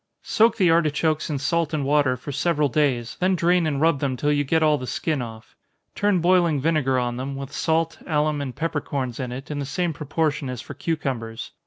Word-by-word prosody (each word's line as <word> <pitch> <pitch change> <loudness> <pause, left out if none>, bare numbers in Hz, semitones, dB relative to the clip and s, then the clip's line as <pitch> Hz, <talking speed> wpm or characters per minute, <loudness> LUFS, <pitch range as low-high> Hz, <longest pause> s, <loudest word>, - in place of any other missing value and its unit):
_ - - -20
Soak 225 0 +3
the 185 -5 +4
artichokes 155 -1 +1
in 150 - -1
salt 165 +2 0
and 145 -3 -1
water, 140 -2 +2
for 135 +4 -7
several 150 0 +1
days, 125 -5 0
then 185 +1 +2
drain 175 -1 +2
and 140 -3 -1
rub 160 -1 +3
them 135 -2 -1
till 145 +4 +1
you 145 0 +2
get 160 +3 +1
all 150 -2 +3
the 130 - -6
skin 155 0 -1
off. 110 -2 -9 0.4
Turn 205 -4 +1
boiling 175 -4 +3
vinegar 140 -3 +1
on 120 -1 -1
them, 135 +2 -4
with 135 0 -7
salt, 165 0 0
alum, 150 -2 +1
and 130 -3 -5
peppercorns 145 -6 -3
in 125 -2 -3
it, 135 +4 -7
in 145 - -3
the - - -2
same 170 +4 -1
proportion 150 -1 -1
as 125 -2 -5
for - - -8
cucumbers. 130 -9 -3
150 Hz, 215 wpm, -23 LUFS, 135-165 Hz, 0.4 s, the